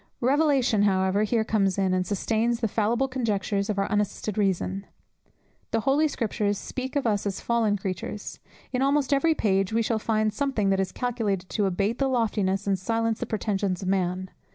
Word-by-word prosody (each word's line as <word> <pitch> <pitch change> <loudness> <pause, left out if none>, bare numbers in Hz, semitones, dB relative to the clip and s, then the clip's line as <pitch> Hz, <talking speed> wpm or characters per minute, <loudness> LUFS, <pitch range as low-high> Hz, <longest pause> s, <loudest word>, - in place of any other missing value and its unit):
Revelation, 270 -4 +3
however, 190 0 +2
here 220 +1 +1
comes 200 -4 +1
in, 190 -1 +1
and 185 0 0
sustains 225 +3 0
the 230 - +1
fallible 230 +5 +1
conjectures 210 -5 -1
of 210 - -1
our 195 - +1
unassisted 205 0 -1
reason. 195 -1 -1 0.8
The 225 - 0
Holy 285 +6 +3
Scriptures 210 -6 -1
speak 260 +5 -5
of 285 - 0
us 205 -2 +1
as 195 - -3
fallen 225 -3 +1
creatures: 195 +2 -5 0.3
in 250 - 0
almost 280 0 +2
every 315 +4 +3
page 195 -4 +1
we 230 +1 +2
shall 225 0 0
find 215 -1 0
something 225 -6 0
that 195 - +2
is 190 -1 -1
calculated 220 -7 -2
to 205 -3 0
abate 200 +5 -1
the 275 - +2
loftiness 205 -6 0
and 195 -2 +1
silence 225 +3 0
the 245 - -3
pretensions 200 -4 -1
of 185 - -2
man. 185 -1 -1
210 Hz, 180 wpm, -26 LUFS, 195-235 Hz, 0.8 s, Revelation